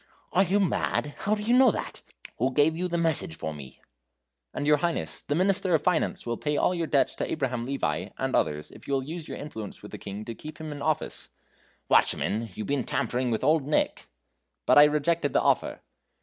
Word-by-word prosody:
"Are 185 - +4
you 195 +2 +2
mad? 160 -5 0
how 210 +1 +1
do 210 - -5
you 235 +3 +3
know 260 0 +7
that? - - -4 0.4
Who 130 +3 +1
gave 150 +4 +3
you 180 +2 -1
the 170 -1 -1
message 160 - +2
for 80 -1 -4
me?" 70 -3 -11 0.7
"And, 145 - -4
your 150 0 +5
Highness, 170 +3 -2
the 145 - -2
Minister 185 0 +2
of 150 - 0
Finance 180 -3 0
will 120 -1 -2
pay 150 -1 -1
all - - +2
your 170 -2 -2
debts 140 -3 +2
to - - -3
Abraham 125 -5 -2
Levi 140 0 -2
and - - -1
others 75 0 0
if - - -14
you 140 - +1
will 135 - -1
use 160 +3 -6
your - - -6
influence 110 -9 -8
with - - -10
the - - -8
King 100 +1 -7
to 115 - -5
keep 155 +7 -10
him 155 -1 -6
in 145 -1 -7
office." 155 +1 -2 0.6
"Watchman! 115 +2 +2
you've 110 - -4
been 140 -2 0
tampering 125 +2 -1
with 115 +1 -1
Old 150 0 +3
Nick." 150 - 0 0.6
"But - - +6
I 145 - +10
rejected 150 0 +1
the - - +3
offer." - - +1
150 Hz, 215 wpm, -27 LUFS, 125-170 Hz, 0.7 s, I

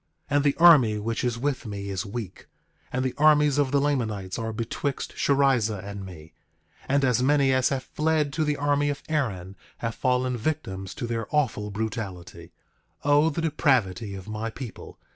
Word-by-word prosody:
9:17 - - +1
And 145 - +3
the 145 -1 +2
army 145 -11 +7
which 115 +2 -3
is 120 -2 0
with 135 -1 -2
me 100 -1 -5
is 100 +2 -3
weak; 100 -3 -7 0.4
and 130 +1 -1
the 130 - -1
armies 150 -1 +5
of 140 -2 +2
the 140 +1 +2
Lamanites 110 -10 -1
are 115 0 -3
betwixt 115 +5 -3
Sherrizah 130 -7 +2
and 100 -1 -6
me; 80 -4 -11 0.6
and 140 0 +3
as 125 -1 +2
many 140 0 +3
as 130 0 +3
have 135 -2 -2
fled 155 -2 0
to 155 - 0
the 150 -1 0
army 145 0 +1
of 145 - -4
Aaron 100 - -2 0.2
have 115 -1 -3
fallen 125 0 0
victims 95 -9 -3
to - - -4
their 115 -1 -3
awful 125 -8 0
brutality. 95 -5 -5 0.5
9:18 145 - +2
O 145 +2 +5
the 160 +2 -3
depravity 120 - +1
of 95 0 -9
my 110 +1 -3
people! 120 0 -9
125 Hz, 180 wpm, -26 LUFS, 105-145 Hz, 0.6 s, army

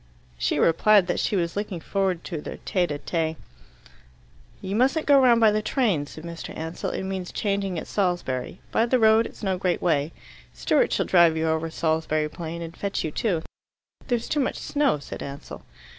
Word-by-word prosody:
She - - 0
replied 200 +4 +4
that 175 - -1
she - - 0
was 170 -3 -1
looking 205 -3 -3
forward 190 -1 -1
to 160 -3 -5
their - - -7
tete 180 -2 +1
a 145 - -2
tete. 160 +1 -2 1.2
"You 195 +1 -4
mustn't 270 +7 +2
go 285 -1 +6
round 240 -3 +5
by 220 -2 +6
the 215 +1 0
trains," 210 - 0
said 155 - -10
Mr. 170 -1 -7
Ansell. 160 +2 -4
"It - - -4
means 190 -1 -4
changing 195 -3 -1
at - - -4
Salisbury. 175 -7 -2
By 230 - +2
the 255 - +3
road 220 0 +5
it's - - -14
no 190 -2 0
great 180 -2 0
way. 155 -3 +1 0.4
Stewart - - +2
shall - - +1
drive 170 -3 +5
you 160 0 0
over 160 +1 0
Salisbury 160 -1 0
Plain, 170 +1 -6
and 165 0 -8
fetch 200 -1 -2
you 155 - -2
too." 175 -3 -1 0.6
"There's 240 -3 -1
too 300 - 0
much 270 - 0
snow," 290 - +1
said 140 - -8
Ansell. 140 0 -8
180 Hz, 190 wpm, -25 LUFS, 160-210 Hz, 1.2 s, go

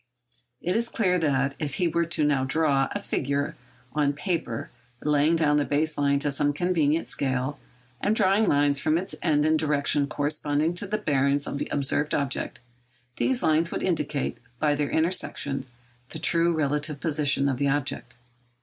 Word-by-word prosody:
It 180 +3 0
is 235 +1 0
clear 180 -5 +1
that, 140 -3 +1
if 145 -3 -3
he 180 - +1
were 170 0 0
now 145 -3 +2
to 130 - -2
draw 140 -2 +2
a 205 - -2
figure 140 -6 -2 0.4
on 145 -1 +1
paper, 145 - -3 0.3
laying 150 +2 +3
down 150 -2 +3
the 145 - +2
base 150 +2 0
line 140 -1 +2
to 145 - 0
some 145 +1 0
convenient 165 -1 +1
scale, 135 +1 -1 0.4
and 210 - +1
drawing 205 +1 +3
lines 145 -1 +3
from 155 +3 +2
its 190 +3 -4
ends 150 -3 +2
in 155 0 +3
directions 145 -1 +1
corresponding 150 +2 0
to 180 +3 0
the 215 +2 -1
bearings 140 -6 +1
of 140 - -4
the - - -3
observed 145 +1 0
object, 140 -3 -2 0.6
these 260 -2 0
lines 160 +1 +2
would - - -4
indicate, 150 -5 -1 0.2
by 150 +2 +2
their 145 0 -1
intersection, 160 -5 0 0.4
the - - -6
true 170 +2 +2
relative 150 -1 -1
position 145 -3 +1
of 135 -2 0
the 140 +2 +1
object. 130 -3 -3
150 Hz, 170 wpm, -26 LUFS, 140-165 Hz, 0.6 s, laying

